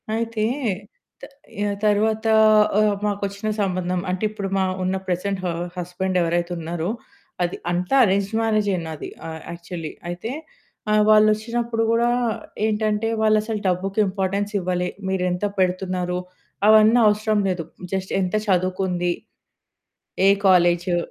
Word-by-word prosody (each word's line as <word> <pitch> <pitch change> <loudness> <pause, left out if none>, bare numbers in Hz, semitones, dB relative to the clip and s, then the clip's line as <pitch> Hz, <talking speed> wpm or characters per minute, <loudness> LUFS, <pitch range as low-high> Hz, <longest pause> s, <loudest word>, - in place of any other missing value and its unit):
అయితే, 225 -1 -1 0.9
త 275 - -30 0.2
ఆహ్, 205 -1 -1
తర్వాత 215 +1 +2 0.5
ఆహ్, 210 -1 +3
మాకొచ్చిన 200 0 -3
సంబంధం, 185 -2 -1
అంటే 185 +3 -2
ఇప్పుడు 205 -2 -5
మా 190 - +2 0.2
ఉన్న 185 +1 0
ప్రెజెంట్ 185 +2 -1
హ - - +1 0.3
హస్బెండ్ 180 +1 -2
ఎవరైతే 170 +1 0
ఉన్నారో 170 +1 -3 0.5
అది 175 - -2
అంతా 180 +7 0
అరేంజ్‌డ్ 200 0 +1
మ్యారేజే 215 -3 +1
నాది. 160 -2 -6 0.2
ఆహ్, 160 0 -7
యాక్చువల్లీ 170 -1 -7 0.2
అయితే 180 +7 -5 0.6
ఆహ్, 210 0 +4
వాళ్ళొచ్చినప్పుడు 225 +2 +3
గూడా 235 +1 +3 0.6
ఏంటంటే 215 0 0
వాళ్ళసలు 215 0 +2
డబ్బుకి 190 +3 -1
ఇంపార్టెన్స్ 195 +1 -2
ఇవ్వలే. 180 -1 -1 0.2
మీరెంత 180 0 0
పెడుతున్నారు 180 -1 0 0.5
అవన్నీ 220 +2 +6
అవసరం 210 0 +2
లేదు. 180 -2 -2 0.3
జస్ట్ 190 0 -2
ఎంత 185 +2 -1
చదువుకుంది? 185 -1 0 1.2
ఏ - - +7 0.2
కాలేజు? 175 -1 +4
195 Hz, 120 wpm, -22 LUFS, 180-215 Hz, 1.2 s, ఏ